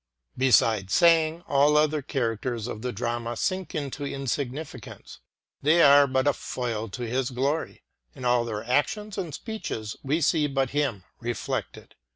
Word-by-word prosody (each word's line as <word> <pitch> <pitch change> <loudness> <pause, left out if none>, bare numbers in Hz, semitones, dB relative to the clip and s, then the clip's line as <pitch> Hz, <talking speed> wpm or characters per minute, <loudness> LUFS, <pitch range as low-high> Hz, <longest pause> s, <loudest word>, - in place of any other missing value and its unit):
Beside 115 -6 +3
Sang, 165 - +4
all 145 +2 +4
other 150 0 +2
characters 120 -3 -2
of 110 -3 -6
the 125 +1 -2
drama 120 +1 -3
sink 185 -3 -2
into 145 -1 -4
insignificance. 140 +1 -5 0.4
They 160 +4 +5
are 140 0 +7
but 130 0 +1
a 145 - +4
foil 115 -3 -4
to 125 +5 -6
his 125 +2 -1
glory. 135 +5 -2 0.3
In 125 - -7
all 120 -1 +3
their 110 -2 -4
actions 195 - 0
and 175 -5 -4
speeches 125 - -5
we 145 +4 0
see 155 -1 +2
but 135 -2 -1
him 140 -10 -1 0.2
reflected. 120 -1 -4
135 Hz, 150 wpm, -26 LUFS, 120-150 Hz, 0.4 s, are